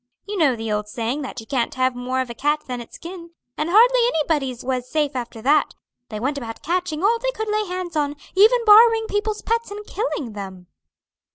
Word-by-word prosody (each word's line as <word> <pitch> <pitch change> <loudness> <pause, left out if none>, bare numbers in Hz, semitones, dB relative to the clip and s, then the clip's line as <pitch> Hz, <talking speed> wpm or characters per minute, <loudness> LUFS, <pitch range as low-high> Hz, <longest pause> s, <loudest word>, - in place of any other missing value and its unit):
You 415 - -4
know 305 -9 +3
the 225 -1 -4
old 210 0 -1
saying 235 +6 -3
that 265 -2 -6
you - - -13
can't 250 -2 -1
have 255 0 +1
more 255 +1 -2
of 255 - -5
a - - -5
cat 295 +5 0
than 250 -1 -5
its 235 - -12
skin, 335 -1 -10 0.2
and 305 +2 -2
hardly - - +6 0.2
anybody's 285 -6 -1
was 255 -1 -2
safe 295 -2 0
after 235 -3 -5
that; 295 +3 +3 0.3
they 215 - -5
went 280 +5 -1
about 225 -3 -8
catching 350 -1 -2
all 460 +3 +3
they - - -1
could 440 -3 -4
lay 425 0 0
hands 360 -2 -5
on, 290 -1 0 0.2
even 455 +5 +5
borrowing 450 +1 +7
people's 420 0 -2
pets 460 0 -1
and 415 +1 -8
killing 325 - -3
them." 190 -3 -8
300 Hz, 210 wpm, -22 LUFS, 250-415 Hz, 0.3 s, borrowing